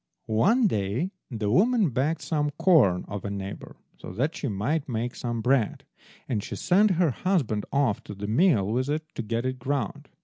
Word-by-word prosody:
One 200 - +3
day 115 - 0 0.2
the 110 -5 -2
woman 215 - +3
begged 140 +7 0
some 150 -2 0
corn 155 - +4
of 100 -1 -6
a 100 - -3
neighbour 100 0 -6 0.2
so - - -8
that 140 - -1
she - - -3
might 135 +9 -1
make 120 +1 -2
some 120 -2 -3
bread, 125 -3 +1 0.4
and 105 -5 -1
she - - -6
sent 205 +4 +3
her 170 -4 +3
husband 135 - -1
off 140 -7 +1
to 105 - -8
the 100 +2 -6
mill 115 - +3
with 130 +4 0
it 155 +2 -1
to - - -4
get 115 +2 -2
it 130 0 -2
ground. 130 -3 -3
130 Hz, 190 wpm, -26 LUFS, 105-160 Hz, 0.4 s, corn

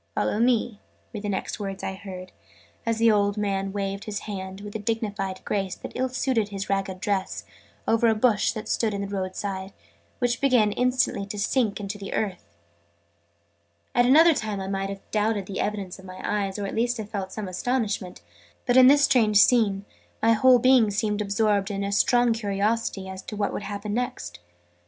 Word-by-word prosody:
"Follow 210 - 0
me!" 235 -3 +1 0.3
were 215 - -4
the 205 0 -4
next 195 +2 -3
words 195 -2 -5
I - - -2
heard, 185 -2 -9 0.6
as 230 -1 +1
the 230 0 +5
old 205 0 +2
man 195 -2 -1
waved 195 0 -3
his 210 -2 -4
hand, 190 -1 -6
with 205 0 -9
a - - -2
dignified 205 -3 -3
grace 195 -3 -1
that - - -9
ill 260 0 -1
suited 250 -4 0
his 195 -1 -4
ragged 195 -1 -1
dress, 195 -1 -2 0.4
over 230 +1 +3
a 220 - +3
bush, 215 -2 +2
that 215 - -6
stood 220 -2 0
by - - -2
the 200 0 -3
road 190 -2 -4
side, 195 -1 -4 0.4
which 245 +2 0
began 245 -6 +4
instantly 250 -4 0
to 210 +1 -6
sink 215 +1 0
into 200 0 -5
the 195 - -5
earth. 180 - -4 1.4
At 245 0 +4
another 320 +5 +7
time 215 -6 -3
I 190 - -4
might 195 0 -2
have 195 0 -6
doubted 210 -2 0
the 190 0 -5
evidence 200 -3 -3
of 190 - -13
my 185 0 -10
eyes, 200 -2 -1
or 205 - -3
at 195 - -4
least 240 +2 0
have 210 -2 -7
felt 190 -2 -4
some 210 0 -5
astonishment: 205 - -2 0.4
but, 245 - +3
in 255 -1 +9
this 285 +1 +6
strange 230 -7 +4
scene, 205 -3 +4 0.3
my 230 +1 +4
whole 255 +3 +6
being 250 -2 +5
seemed 210 0 -1
absorbed 205 -1 +1
in 200 0 -2
strong 240 +3 +3
curiosity 205 -1 -1
as 190 0 -7
to 210 - -8
what 205 -1 -1
would - - -3
happen 205 +1 -5
next. 85 - -3
205 Hz, 195 wpm, -25 LUFS, 195-225 Hz, 1.4 s, in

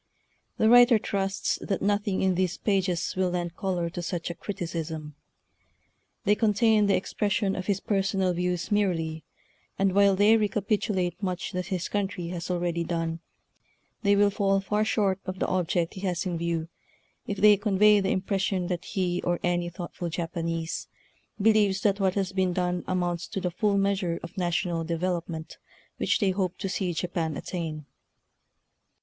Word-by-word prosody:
The 220 - +3
writer 245 0 +7
trusts 195 -2 -1
that 195 - -2
nothing 205 -1 +1
in 190 -1 +3
these 180 -1 0
pages 190 -4 0
will 185 -1 +1
lend 175 -1 -3
color 180 -3 -1
to 175 - -5
such 170 0 -3
a - - -4
criticism. 165 -5 -5 1.1
They 205 - +4
contain 215 0 +3
the 195 - +4
expression 195 +1 0
of 185 - -5
his 200 -2 +1
per 200 -1 0
sonal 190 -1 0
views 180 +1 -2
merely, 165 -6 0 0.5
and 195 -1 +2
while 200 0 +5
they 205 +3 +5
reca 210 -1 -1
pitulate 190 -5 0
much 185 -2 -3
that 180 -2 -3
his 185 -3 -2
country 195 -4 -2
has 175 0 -5
al 180 -1 0
ready 170 -1 -1
done, 165 -1 -2 0.8
they 200 -1 +4
will 200 0 +4
fall 195 0 +2
far 210 +2 0
short 200 -3 +1
of 185 0 -4
the - - 0
object 175 -2 0
he 190 - -8
has 185 -1 -1
in 180 -2 -2
view 165 -1 -2 0.6
if 200 - -3
they 210 +1 +7
convey 210 +1 +4
the 195 -1 0
impression 190 -1 0
that 175 -1 -3
he, 180 -2 -1
or 175 -1 0
any 175 -1 0
thoughtful 175 0 -6
Japanese, 165 -1 -3 0.5
believes 205 -2 +3
that 200 -1 +2
what 190 -2 +1
has 195 -2 0
been 190 -2 +1
done 180 0 -1
amounts 175 -2 -1
to - - -4
the 180 -1 -2
full 205 +2 +1
measure 195 -3 0
of 170 - -8
na 180 -3 0
tional 170 -1 -1
development 170 -1 -3 0.4
which - - +1
they 200 -4 +2
hope 185 -1 -2
to - - -3
see 185 -1 -1
Japan 165 -3 -2
attain. 160 -4 -5
185 Hz, 170 wpm, -27 LUFS, 175-200 Hz, 1.1 s, writer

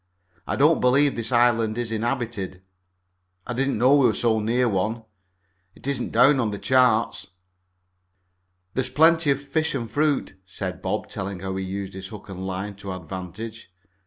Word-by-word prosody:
I - - -1
don't - - +4
believe 135 +2 +4
this 115 0 -4
island 115 -2 +3
is 120 -2 -2
inhabited. 110 -5 -3 0.8
I 125 - -4
didn't 135 +1 0
know 125 +5 +5
we 140 -3 +5
were 110 - +1
so 110 0 +2
near 120 +4 +1
one. 110 +3 -1 0.7
It - - -13
isn't 135 -3 -2
down 130 +4 +5
on 115 -4 +1
the 100 - -4
charts." 125 -2 +2 1.5
"There 130 - +1
is - - -3
plenty 160 0 +4
of 140 -1 +3
fish 145 +2 -1
and 115 -5 -4
fruit," 145 -9 0
said 95 - -6
Bob, - - -2
telling 95 -2 -5
how 95 0 -4
he 95 0 -3
had 95 - -6
used 100 0 -4
his 95 0 -7
hook 105 0 -11
and 95 0 -6
line 95 +2 -4
to 100 -1 -7
advantage. 95 +5 -7
115 Hz, 175 wpm, -24 LUFS, 95-130 Hz, 1.5 s, know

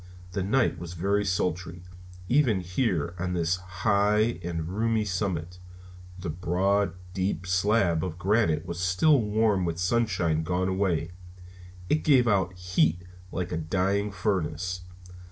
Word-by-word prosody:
The 100 +1 -2
night 115 0 +1
was 85 0 -7
very 100 +4 0
sultry, 90 -2 -2 0.4
even 120 -5 +3
here 90 - -1
on 90 +1 -2
this 85 0 +1
high 100 +4 +1
and 85 -2 -3
roomy 110 +3 0
summit. 90 -3 -3 0.6
The 90 -3 -4
broad, 95 +3 +1 0.2
deep 95 -1 -2
slab 90 -2 +2
of 85 -3 -4
granite 90 -4 +1
was 85 0 -5
still 95 - +3
warm 105 -2 +1
with 85 -1 -2
sunshine 90 -4 +1
gone 90 +3 -1
away, 95 -3 0 0.8
and 155 - +1
gave 130 -5 +5
out 95 -4 +2
heat 90 -1 +1 0.3
like 90 -1 -3
a - - -1
dying 100 +5 0
furnace. 90 -2 -2
90 Hz, 135 wpm, -27 LUFS, 85-105 Hz, 0.8 s, gave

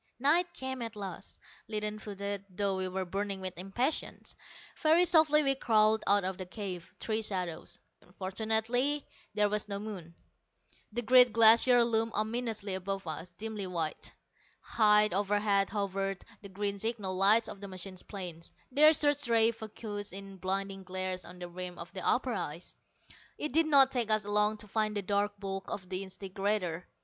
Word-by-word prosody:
Night 325 +7 +3
came 260 -1 -4
at 230 -1 -5
last, 195 -3 -7 0.3
leaden 210 0 -3
footed, 200 -1 -4
though 195 +1 0
we 190 0 -2
were 185 0 -3
burning 195 +2 -3
with 185 -1 -3
impatience. 195 - -2 0.4
Very 325 +3 +4
softly 310 -3 +5
we 275 -1 +3
crawled 220 -4 +3
out 200 0 +4
of 185 0 -3
the 185 - -4
cave, 185 -4 -7
three 220 0 -1
shadows. 180 -6 -3 0.4
Fortunately 220 +8 0 0.3
there 210 0 +4
was 210 0 -2
no 200 - -2
moon. 195 -6 -7 0.8
The 240 +3 -3
great 250 +1 +7
Glacier 230 +2 +6
loomed 225 -1 0
ominously 220 -2 -2
above 195 +1 -3
us, 165 +2 -5
dimly 215 -3 -4
white. 165 -4 -3 0.5
High 210 -1 +4
overhead 200 +1 +2
hovered 195 -1 -2 0.2
the 200 - -10
green 200 +1 -3
signal 210 -4 -2
lights 205 +4 +4
of 200 - -9
the 200 - -6
machine 185 0 -8
planes, 175 -5 -7 0.2
their 305 +4 +7
search 290 -2 +2
rays 230 -1 +3
focussed 210 -2 -6
in 195 0 -8
blinding 195 +1 -3
glares 185 0 -4
on 180 +1 -11
the 175 0 -7
rim 180 0 -7
of - - -9
the - - -4
upper - - +1
ice. - - -5 0.6
It 300 - -3
did 325 +1 +3
not 275 -3 +6
take 240 -4 0
us 215 -1 +2
long 210 +1 +2
to 210 - -7
find 215 0 -1
the 200 - -2
dark 205 +1 -1
bulk 195 -1 -5
of 185 -2 -5
the 185 +1 -3
disintegrator. 190 -2 -3
205 Hz, 165 wpm, -31 LUFS, 190-225 Hz, 0.8 s, great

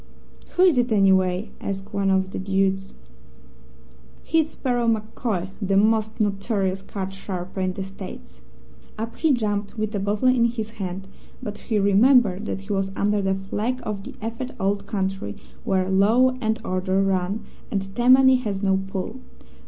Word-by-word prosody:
"'Who 360 - +4
is 345 -9 +5
it, 245 0 +1
anyway?' 190 -1 +3
asked 195 +2 -5
one 200 -1 +1
of 190 0 +2
the - - -4
dudes. 195 0 0 1.3
"'He's 320 -1 +2
Sparrow 245 -5 -1
MacCoy, 215 -4 -1
the 195 -1 +2
most 220 +1 +2
notorious 195 -2 0
card 195 -1 -5
sharper 190 -1 -6
in 185 0 0
the 195 - -4
States.' 185 - -10 0.6
"Up 225 +2 -4
he 320 - +3
jumped 210 -3 -1
with 215 0 -2
a 205 - -1
bottle 205 +5 0
in 250 -2 +4
his 225 -2 -2
hand, 190 +1 -4 0.4
but 210 -3 -5
he 220 - -1
remembered 205 0 +4
that 195 - -3
he 200 +1 -4
was 195 -1 0
under 205 0 +1
the 195 0 +1
flag 210 +6 -2
of 205 -2 -4
the - - -9
effete 230 +3 -5
Old 200 +1 -1
Country, 190 - -2 0.3
where 185 -1 +1
law 215 +7 +4
and 220 0 +1
order 185 +1 +1
run, 195 +2 0 0.3
and 195 -1 -3
Tammany 260 +2 +6
has 205 -5 -3
no 190 -1 +3
pull. 195 +6 -4
200 Hz, 160 wpm, -24 LUFS, 190-225 Hz, 1.3 s, Tammany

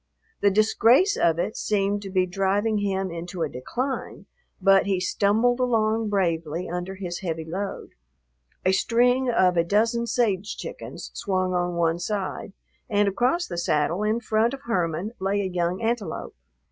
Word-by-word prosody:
The 200 - +5
disgrace 225 - +4
of 165 -1 +2
it 185 +5 -2
seemed 205 -1 0
to 195 - -7
be 185 -1 +2
driving 195 +4 0
him 195 -2 -1
into 170 +1 -4
a 155 - -1
decline, 250 - -4 0.3
but 195 0 +4
he 195 -2 +1
stumbled 215 +6 +2
along 225 -3 +1
bravely 170 -4 -1
under 180 +2 -4
his 180 -2 -5
heavy 165 -4 -4
load. 190 +5 -5 0.7
A 185 - +5
string 245 +5 +2
of 185 -6 +3
a 170 - +4
dozen 225 +6 +1
sage 210 -4 0
chickens - - -8
swung 185 -2 -1
on 175 -1 0
one 170 0 +1
side, 195 +1 -3 0.4
and 205 -2 +2
across 250 - +1
the 170 - -4
saddle 165 +2 0
in 215 +2 +1
front 225 +3 +1
of 275 - -15
Herman 180 - -1
lay 195 +2 0
a - - -2
young 180 +1 -1
antelope. 230 -2 -2
195 Hz, 160 wpm, -25 LUFS, 180-220 Hz, 0.7 s, The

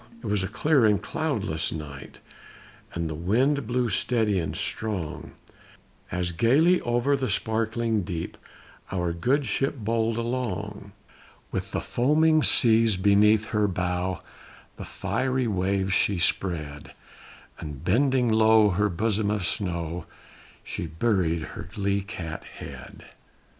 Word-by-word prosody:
It - - -8
was 105 -1 +1
a - - -1
clear 135 +5 +2
and 105 -2 +3
cloudless 80 -1 -1
night, 75 -3 -8 0.7
and 85 -1 -2
the 80 - -4
wind 120 - +1
blew 125 0 0
steady 110 -6 +1
and 80 - -3
strong, 100 -8 -4 0.8
As 90 0 -1
gayly 140 - +3
over 120 +4 +1
the 135 -2 -2
sparkling 115 0 0
deep 85 -2 -5 0.6
our 90 -3 -1
good 130 - +1
ship 135 +7 0
bowled 115 0 -1
along; 105 -4 -4 0.6
With - - -3
the - - -3
foaming 155 +5 +3
seas 115 -6 +5
beneath 105 +3 +4
her 105 -1 +1
bow 90 0 -2 0.5
the - - -8
fiery 130 +6 -1
waves 95 -2 0
she 100 0 +2
spread, 75 -4 -1 0.7
And 75 -2 -8
bending 130 +5 +2
low 110 -1 +5
her 105 +3 +1
bosom 105 +3 0
of 105 -3 -1
snow, 85 -3 -2 0.6
she 85 - -5
buried 85 -1 0
her 85 - -8
lee 100 0 0
cat 85 -5 -7
head. - - -11
105 Hz, 125 wpm, -26 LUFS, 90-120 Hz, 0.8 s, seas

